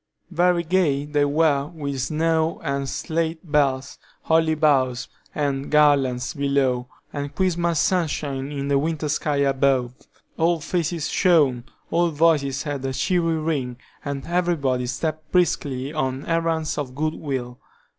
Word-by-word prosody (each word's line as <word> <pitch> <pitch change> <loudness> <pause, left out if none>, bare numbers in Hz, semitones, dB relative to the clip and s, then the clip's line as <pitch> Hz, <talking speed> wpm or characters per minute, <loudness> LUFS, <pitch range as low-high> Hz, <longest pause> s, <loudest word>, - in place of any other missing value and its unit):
Very 175 0 +2
gay 160 -5 +1
they 145 -1 +1
were 145 -1 +2
with 140 -5 -4
snow 160 +3 0
and 140 -1 -2
sleigh 160 +4 -2
bells, 140 -5 0 0.2
holly 160 -1 +3
boughs, 135 -4 +2 0.3
and 140 -2 -1
garlands, 140 -4 +3
below, 140 -4 0 0.3
and 145 0 -5
Christmas 170 -3 +1
sunshine 145 -6 -1
in 140 -1 -3
the 140 -1 +3
winter 155 0 -2
sky 150 0 0
above. 135 -3 +2 0.4
All 165 +1 +2
faces 165 -1 -2
shone, 145 -11 +3 0.3
all 170 +1 +3
voices 145 -4 +2
had 145 -3 -4
a 135 0 -2
cheery 165 +3 +1
ring, 145 -6 -2 0.3
and 140 -1 -4
everybody 160 -8 0
stepped 155 +4 -3
briskly 145 -6 0
on 135 -2 -2
errands 165 -2 0
of 130 -3 -5
good 155 +2 -1
will. 130 -5 -5
145 Hz, 135 wpm, -23 LUFS, 135-165 Hz, 0.4 s, holly